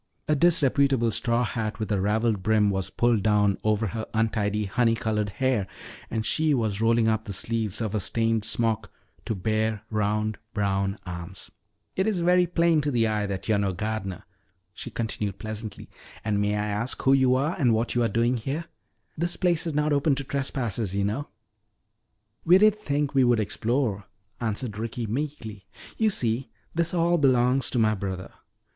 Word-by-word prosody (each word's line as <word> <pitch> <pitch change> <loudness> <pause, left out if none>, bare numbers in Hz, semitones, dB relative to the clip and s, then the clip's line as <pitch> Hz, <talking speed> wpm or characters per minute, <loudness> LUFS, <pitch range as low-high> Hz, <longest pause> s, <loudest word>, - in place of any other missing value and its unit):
A 150 - +3
disreputable 140 -6 +3
straw 120 +2 +1
hat 110 -2 -3
with 110 -1 -4
a 100 -2 +1
raveled 105 +1 +1
brim 105 0 +3
was 95 -1 -1
pulled 120 -3 +2
down 105 -1 +2
over 110 +1 +1
her 110 +2 -4
untidy 105 -2 0
honey 115 +3 +2
colored 105 -2 -1
hair 125 -3 0 0.4
and 110 -1 -2
she 155 +2 +2
was 110 -4 -1
rolling 115 0 +3
up 110 0 0
the 105 - -6
sleeves 110 +1 -1
of 110 -2 -2
a 105 - +1
stained 115 +2 0
smock 110 -1 0 0.3
to 110 - -2
bare 110 +2 -1
round 105 0 0 0.2
brown 100 -1 0
arms. 90 +1 -8 0.4
"It's 195 +1 +1
very 180 +1 +3
plain 170 -2 +2
to 145 - -1
the 120 -4 +2
eye 105 -2 0
that 95 0 -5
you're 110 -2 +2
no 100 -2 0
gardener," 105 -1 -4 0.5
she - - -7
continued 110 -4 -3
pleasantly. 110 0 -6 0.4
"And 105 -2 +1
may 105 0 +1
I 105 0 -1
ask 105 +4 -2
who 135 - +5
you 130 -2 +4
are 145 +6 0
and 125 -5 +4
what 115 +1 +1
you 120 - +1
are 115 - +2
doing 115 +4 +1
here? 140 +8 -3 0.5
This 170 +2 -1
place 175 -2 +2
is 160 - -3
not 150 0 +2
open 140 0 +2
to 140 - -3
trespassers, 120 -7 -2
you 100 - +1
know." 125 +9 -2 1.2
"We 175 +3 +6
did 215 +1 +4
think 145 -6 -1
we 135 -2 +4
would 120 -2 +3
explore," 110 0 -1 0.3
answered 110 -1 -3
Ricky 115 +1 -3
meekly. 110 -5 -5 0.3
"You 220 -1 +2
see, 125 - -1 0.2
this 170 0 0
all 170 0 +2
belongs 130 -1 +3
to - - -2
my 110 -2 +3
brother." 95 -2 -5
115 Hz, 175 wpm, -26 LUFS, 105-135 Hz, 1.2 s, We